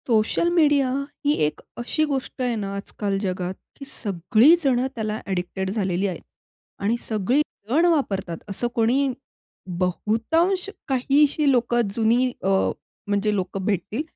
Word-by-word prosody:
Social 225 Hz, +8 st, +2 dB
media 290 Hz, -5 st, +4 dB, 0.4 s
ही 290 Hz, -, +4 dB
एक 150 Hz, -, -6 dB, 0.2 s
अशी 240 Hz, +6 st, 0 dB
गोष्ट 265 Hz, -1 st, -3 dB
आहे 245 Hz, -2 st, 0 dB
ना 200 Hz, -2 st, -4 dB
आजकाल 200 Hz, 0 st, -3 dB
जगात, 185 Hz, -2 st, -2 dB, 0.2 s
की 275 Hz, -, -9 dB
सगळी 215 Hz, -, +3 dB
जण 260 Hz, -3 st, +3 dB, 0.2 s
त्याला 215 Hz, -1 st, -2 dB
एडिक्टेड 190 Hz, 0 st, -2 dB
झालेली 195 Hz, -2 st, 0 dB
आहेत 185 Hz, -, -5 dB, 0.6 s
आणि 215 Hz, +4 st, +2 dB
सगळी 225 Hz, +6 st, +1 dB, 0.3 s
जण 315 Hz, +8 st, +3 dB
वापरतात. 200 Hz, -, 0 dB
असं 200 Hz, +5 st, -2 dB
कोणी, 255 Hz, +4 st, +2 dB, 0.7 s
बहुतांश 275 Hz, -, +1 dB, 0.2 s
काहीशी 285 Hz, +2 st, +3 dB
लोकं 240 Hz, -1 st, +2 dB
जुनी 235 Hz, +3 st, +2 dB
अ, 190 Hz, -, +1 dB, 0.6 s
म्हणजे 205 Hz, +1 st, +1 dB
लोकं 190 Hz, 0 st, -3 dB
भेटतील 205 Hz, -, -1 dB
225 Hz, 130 wpm, -23 LUFS, 195-270 Hz, 0.7 s, media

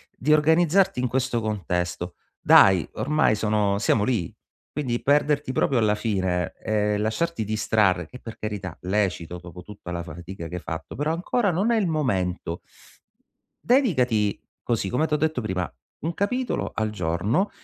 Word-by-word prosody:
di 150 Hz, +5 st, +2 dB
organizzarti 160 Hz, +2 st, +3 dB
in 125 Hz, -, +1 dB
questo 125 Hz, -1 st, 0 dB
contesto. 90 Hz, -4 st, -2 dB, 0.2 s
Dai, 95 Hz, -4 st, +6 dB
ormai 150 Hz, -6 st, +2 dB
sono 105 Hz, -2 st, +1 dB
siamo 105 Hz, 0 st, +2 dB
lì! 105 Hz, -9 st, -1 dB, 0.4 s
Quindi 125 Hz, -5 st, -2 dB
perderti 145 Hz, -1 st, +2 dB
proprio 130 Hz, 0 st, +2 dB
alla 105 Hz, -2 st, +3 dB
fine, 95 Hz, -5 st, -1 dB
e 105 Hz, -1 st, 0 dB
lasciarti 110 Hz, +8 st, -1 dB
distrarre, 105 Hz, -4 st, +1 dB
che 125 Hz, -, -11 dB
per 115 Hz, -, -9 dB
carità, 100 Hz, -5 st, -5 dB
lecito 90 Hz, -3 st, -1 dB
dopo 90 Hz, 0 st, -11 dB
tutta 100 Hz, -3 st, -9 dB
la 85 Hz, -1 st, -3 dB
fatica 85 Hz, +1 st, -8 dB
che 90 Hz, -, -7 dB
hai 90 Hz, -, -5 dB
fatto, 80 Hz, -2 st, -6 dB
però 150 Hz, +4 st, 0 dB
ancora 200 Hz, +5 st, 0 dB
non 195 Hz, +7 st, +1 dB
è 230 Hz, -, +3 dB
il 205 Hz, -4 st, +1 dB
momento. 95 Hz, -, -1 dB, 1.1 s
Dedicati 125 Hz, -, +2 dB, 0.2 s
così, 115 Hz, -5 st, -1 dB
come 125 Hz, +9 st, +1 dB
t' 155 Hz, -, -8 dB
ho -, -, +4 dB
detto 155 Hz, -2 st, 0 dB
prima: 95 Hz, -6 st, -2 dB, 0.3 s
un 165 Hz, +2 st, -3 dB
capitolo 250 Hz, +7 st, -1 dB
al 110 Hz, -1 st, -1 dB
giorno, 105 Hz, -, 0 dB
110 Hz, 155 wpm, -25 LUFS, 95-150 Hz, 1.1 s, Dai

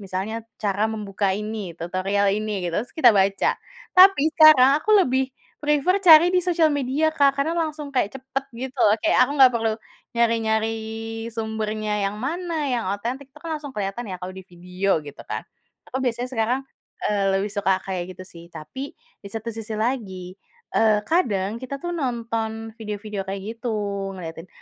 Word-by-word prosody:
misalnya 195 Hz, +2 st, -4 dB, 0.3 s
cara 200 Hz, 0 st, 0 dB
membuka 205 Hz, -2 st, -2 dB
ini, 215 Hz, +1 st, -4 dB, 0.2 s
tutorial 190 Hz, +4 st, 0 dB
ini 215 Hz, -3 st, -3 dB
gitu, 170 Hz, -1 st, -2 dB
terus 245 Hz, -, -8 dB
kita 315 Hz, -, +7 dB
baca. 195 Hz, 0 st, +2 dB, 0.5 s
Tapi 380 Hz, -3 st, +8 dB
sekarang 310 Hz, -5 st, +8 dB
aku 430 Hz, -, -2 dB
lebih 260 Hz, +1 st, 0 dB, 0.3 s
prefer 300 Hz, +5 st, +2 dB
cari 335 Hz, -3 st, +9 dB
di 365 Hz, -, +5 dB
sosial 335 Hz, -3 st, +2 dB
media 285 Hz, +3 st, +1 dB
Kak, 280 Hz, -3 st, +3 dB
karena 295 Hz, +4 st, +1 dB
langsung 310 Hz, -3 st, -2 dB
kayak 250 Hz, -1 st, 0 dB
cepat 265 Hz, +1 st, -4 dB
gitu 260 Hz, +2 st, -6 dB
loh. 210 Hz, -, +6 dB
Kayak -, -, +3 dB
aku -, -, -3 dB
nggak 260 Hz, -2 st, +7 dB
perlu 225 Hz, -2 st, 0 dB, 0.4 s
nyari-nyari 225 Hz, -1 st, +1 dB, 0.6 s
sumbernya 220 Hz, -1 st, -3 dB, 0.2 s
yang 205 Hz, -, -7 dB
mana, 335 Hz, +9 st, -3 dB, 0.2 s
yang 240 Hz, -2 st, -1 dB
otentik, 245 Hz, +7 st, -4 dB
itu -, -, -41 dB
kan 330 Hz, -, -4 dB
langsung 290 Hz, -, -7 dB
kelihatan 200 Hz, +4 st, -3 dB
ya 185 Hz, -, -4 dB
kalau 185 Hz, +1 st, -6 dB
di 190 Hz, -, -8 dB
video 180 Hz, +2 st, -1 dB
gitu 145 Hz, -, -10 dB
kan. -, -, -4 dB, 0.5 s
Aku 260 Hz, -, -2 dB
biasanya 245 Hz, -1 st, -1 dB
sekarang, 240 Hz, +2 st, 0 dB, 0.5 s
eee, 205 Hz, -1 st, +1 dB
lebih 205 Hz, +2 st, -2 dB
suka 200 Hz, -2 st, +2 dB
kayak 185 Hz, -2 st, -2 dB
gitu 185 Hz, -, -8 dB
sih, 170 Hz, -2 st, -12 dB
tapi 160 Hz, -, -9 dB, 0.4 s
di 200 Hz, -, -8 dB
satu 225 Hz, +1 st, -5 dB
sisi 220 Hz, -1 st, -5 dB
lagi, 195 Hz, -7 st, -3 dB, 0.4 s
eee, 215 Hz, -2 st, +4 dB
kadang 215 Hz, -, 0 dB
kita 275 Hz, +2 st, -5 dB
tuh 350 Hz, 0 st, -3 dB
nonton 225 Hz, -5 st, -3 dB
video-video 210 Hz, -2 st, -5 dB
kayak 195 Hz, 0 st, -4 dB
gitu, 235 Hz, +1 st, -4 dB, 0.5 s
ngelihatin 165 Hz, 0 st, -8 dB
225 Hz, 170 wpm, -23 LUFS, 200-270 Hz, 0.6 s, cari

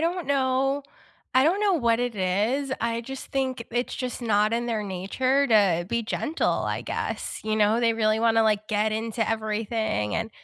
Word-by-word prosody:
don't 340 Hz, 0 st, -1 dB
know 270 Hz, 0 st, +1 dB, 0.5 s
I 260 Hz, +1 st, +5 dB
don't 360 Hz, +7 st, +2 dB
know 405 Hz, -2 st, +3 dB
what 235 Hz, -7 st, +2 dB
it 245 Hz, -2 st, -1 dB
is, 210 Hz, +9 st, 0 dB
I 230 Hz, 0 st, -1 dB
just 270 Hz, +3 st, -7 dB
think 260 Hz, -3 st, -2 dB
it's 245 Hz, +1 st, -2 dB
just 255 Hz, -1 st, -4 dB
not 215 Hz, -1 st, +2 dB
in 235 Hz, +1 st, 0 dB
their 225 Hz, -3 st, -1 dB
nature 255 Hz, +9 st, 0 dB
to 195 Hz, -7 st, +3 dB
be 235 Hz, +2 st, 0 dB
gentle, 305 Hz, +8 st, -1 dB, 0.2 s
I -, -, -2 dB
guess, -, -, -4 dB
you 215 Hz, 0 st, -1 dB
know? 215 Hz, +2 st, +3 dB
They 230 Hz, -1 st, +2 dB
really 215 Hz, -1 st, +1 dB
wanna, 225 Hz, -1 st, +4 dB
like, 215 Hz, -1 st, +1 dB
get 215 Hz, 0 st, +1 dB
into 225 Hz, 0 st, -2 dB
everything 220 Hz, -, -1 dB
and 225 Hz, -, -2 dB
230 Hz, 185 wpm, -25 LUFS, 215-260 Hz, 0.5 s, I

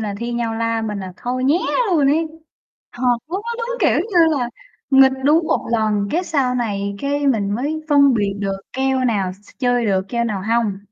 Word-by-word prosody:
là 210 Hz, -2 st, -3 dB
thi 235 Hz, +1 st, -4 dB
nhau 235 Hz, -1 st, -2 dB
la 230 Hz, 0 st, -1 dB
mình 210 Hz, -2 st, -3 dB
là 185 Hz, -1 st, -7 dB
thôi 255 Hz, +1 st, -3 dB
nhé 300 Hz, +6 st, +3 dB, 0.3 s
luôn 300 Hz, -5 st, +3 dB
ấy! 320 Hz, +3 st, +2 dB, 0.7 s
Thật, 245 Hz, -, -9 dB, 0.3 s
lúc 380 Hz, +4 st, -3 dB
đó 470 Hz, -, -4 dB
đúng -, -, -3 dB
kiểu 290 Hz, -, +3 dB
như 340 Hz, -6 st, +3 dB
là 240 Hz, -1 st, -1 dB, 0.4 s
nghịch 265 Hz, 0 st, +6 dB
đúng 315 Hz, +3 st, +4 dB
một -, -, 0 dB
lần, 210 Hz, -3 st, +1 dB
cái, 355 Hz, +3 st, 0 dB
sau 265 Hz, -6 st, 0 dB
này, 200 Hz, -4 st, -2 dB
cái, 285 Hz, 0 st, -1 dB
mình 205 Hz, -6 st, +1 dB
mới 295 Hz, +7 st, -2 dB
phân 280 Hz, -2 st, +5 dB
biệt 205 Hz, -3 st, 0 dB
được 195 Hz, -1 st, -2 dB, 0.2 s
keo 265 Hz, 0 st, 0 dB
nào 200 Hz, -6 st, 0 dB
s -, -, -15 dB
s -, -, -20 dB
chơi 245 Hz, -2 st, +1 dB
được, 190 Hz, -2 st, +1 dB
keo 235 Hz, -1 st, -1 dB
nào 205 Hz, -4 st, -3 dB
hông. 220 Hz, -2 st, 0 dB
245 Hz, 215 wpm, -20 LUFS, 210-285 Hz, 0.7 s, nghịch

